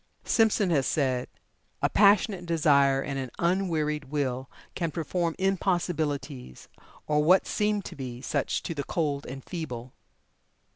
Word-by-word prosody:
Simpson 215 -4 +3
has 140 -5 +2
said: 130 -4 0 0.6
"A - - +5
passionate 200 -3 +3
desire 140 -4 +3
and 135 -1 -3
an 130 -1 -4
unwearied 165 -5 0
will 135 -2 -2 0.2
can 170 -2 -2
perform 165 +1 -2
impossibilities, 160 - -2 0.4
or 150 0 +2
what 180 +5 +5
seem 210 -1 0
to - - -8
be 125 -3 -6
such 130 - -1
to - - -3
the 145 -3 -3
cold 145 -2 -2
and 135 +1 -8
feeble." 130 -8 -6
150 Hz, 135 wpm, -27 LUFS, 135-180 Hz, 0.6 s, A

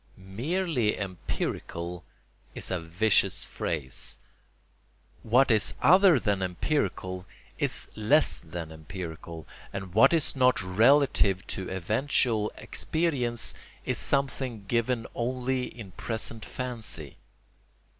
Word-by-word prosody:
"Merely 120 - -1
empirical" 90 -2 -4 0.5
is - - -4
a 90 - 0
vicious 95 +3 +2
phrase: 75 -6 -3 1.0
what 125 +3 +4
is 110 -2 +3
other 185 -3 +6
than 100 -4 0
empirical 95 - -2 0.3
is - - 0
less 125 +9 +3
than 80 0 -7
empirical, 80 -1 -8 0.2
and 95 -2 -6
what 110 - +6
is 165 -4 +2
not 130 -1 +4
relative 105 -1 +4
to 95 - -4
eventual 110 +3 +1
experience 135 -8 -1 0.3
is - - +1
something 130 -6 0
given 115 +1 0
only 125 +1 -1
in 105 -6 -9
present 115 +3 -4
fancy. 115 - -5
110 Hz, 100 wpm, -28 LUFS, 90-130 Hz, 1.0 s, other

